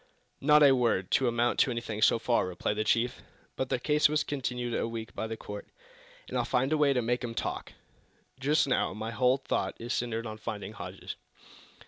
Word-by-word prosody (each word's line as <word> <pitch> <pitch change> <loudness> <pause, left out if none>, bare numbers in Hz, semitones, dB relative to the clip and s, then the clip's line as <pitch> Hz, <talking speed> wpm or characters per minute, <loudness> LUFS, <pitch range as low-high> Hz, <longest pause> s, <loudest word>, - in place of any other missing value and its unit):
"Not 150 +1 +6
a 140 - +8
word 115 -7 +1
to 130 - +3
amount 120 0 +1
to - - +4
anything, 115 -3 -4
so 110 - +5
far," 115 -3 +1
replied 90 +3 -2
the 110 - +1
chief. 120 +3 +1 0.3
"But 130 - -2
their - - +1
case 150 +4 +3
was 155 0 +1
continued 125 -4 -3
a - - 0
week 115 -1 -6
by 110 - -3
the 110 0 -5
court, 105 -1 -8 0.6
and - - -6
I'll - - +2
find 130 +4 +1
a - - +3
way 145 -2 +4
to 125 -3 +1
make 120 +2 0
'em 115 -1 -4
talk! - - -4 0.7
Just 145 +4 +3
now, 130 - +1
my 110 +1 -4
whole 125 +2 +3
thought 135 - -2
is 120 +2 -3
centered 115 -1 -2
on 110 -1 -6
finding 105 -1 -5
Hodges." - - -7
120 Hz, 205 wpm, -29 LUFS, 110-135 Hz, 0.7 s, a